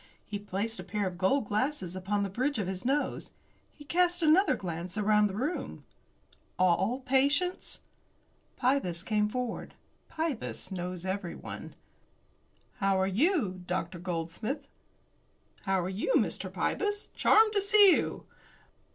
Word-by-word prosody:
He 205 - -4
placed 205 +3 -3
a - - -5
pair 205 +1 -2
of 180 -1 -4
gold 215 +7 +2
glasses 210 - -1
upon 200 +2 -1
the 200 - -2
bridge 260 +7 0
of 205 - -1
his 185 0 -4
nose. 280 +4 -1 0.4
He 295 - -14
cast 350 +2 +2
another 335 +6 +5
glance 175 +1 -5
around 210 0 +4
the 195 - -6
room. 280 - -3 0.7
"All 190 +7 +2
patients?" 280 +7 +1 0.8
Pybus 245 -10 0
came 210 0 +1
forward. 250 +1 -4 0.3
Pybus 315 -10 -3
knows 180 -1 -4
everyone. 190 -2 -5 1.0
"How 195 -1 +2
are 190 - +3
you, 210 - +1
Dr. 175 -1 -2
Goldsmith?" 180 - -4 1.0
"How 195 -1 +2
are - - -2
you, 195 - -1
Mr. - - -1
Pybus? 415 0 -1
Charmed 435 0 +5
to 405 - +2
see 400 0 +7
you." - - 0
210 Hz, 135 wpm, -30 LUFS, 185-290 Hz, 1.0 s, see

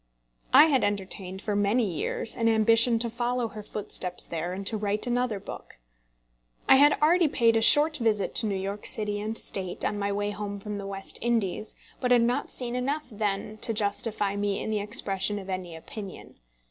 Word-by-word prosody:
I 285 +4 +9
had 280 -6 +2
entertained 190 -1 -3
for 210 - -1
many 205 +4 +2
years 190 +4 -2
an 230 -1 +2
ambition 230 +2 +4
to 235 +1 0
follow 240 0 -2
her 215 -1 -8
footsteps 195 -3 -4
there, 170 +1 -4
and 195 +2 -5
to 220 - -1
write 210 0 +2
another 245 -3 0
book. 190 - -10 0.9
I 265 - +8
had 290 +2 +6
already 340 +2 +5
paid 230 -5 +3
a 225 - +3
short 305 +6 +5
visit 220 -5 0
to 220 - +1
New 200 - -1
York 200 +2 -5
City 210 -1 -2
and 215 +2 -3
State 185 -2 -3
on 205 - -1
my 200 0 -1
way 205 +1 -1
home 205 0 -5
from 205 0 -5
the 195 - -6
West 195 0 -6
Indies, 220 -3 -1 0.2
but 250 - -1
had 245 -1 +5
not 240 +1 -1
seen 245 -1 -3
enough 280 +5 -2
then 210 0 -3
to 225 +1 -1
justify 205 -1 0
me 205 -1 -1
in - - -3
the 215 - 0
expression 205 -2 -1
of 195 -1 -6
any 180 -3 -5
opinion. 195 +4 -10
210 Hz, 195 wpm, -27 LUFS, 200-235 Hz, 0.9 s, I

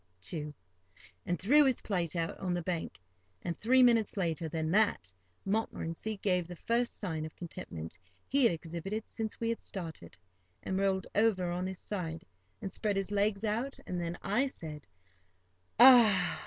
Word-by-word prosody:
too, 150 - -3 0.8
and 175 - 0
threw 285 +10 +6
his 265 -3 +2
plate 175 -6 -1
out 165 -1 -1
on 180 -2 -1
the 175 - -1
bank; 170 - -3 0.4
and, 170 - -2
three 255 +7 +4
minutes 230 -4 +3
later 165 -3 -1
than 160 0 -2
that, 190 - +2 0.3
Montmorency 210 -1 -2
gave 180 -4 +1
the 175 - -8
first 235 +6 -1
sign 160 -6 -3
of 155 - -7
contentment 85 - -7 0.3
he 280 +2 +2
had 235 - +6
exhibited 170 +6 -5
since 220 -2 -5
we 230 - -1
had 230 - -2
started, 160 - -7 0.5
and 190 - -1
rolled 190 -1 +1
over 200 -5 +2
on 180 +1 -2
his 190 0 -5
side, 165 -6 -5 0.4
and 195 -1 -4
spread 210 -2 -1
his 195 0 -2
legs 205 0 +1
out; 230 +6 -1
and 180 -1 -3
then 170 0 -3
I 230 +8 +2
said, 155 - -9 0.9
"Ah!" 235 -7 +7
190 Hz, 165 wpm, -32 LUFS, 165-220 Hz, 0.9 s, Ah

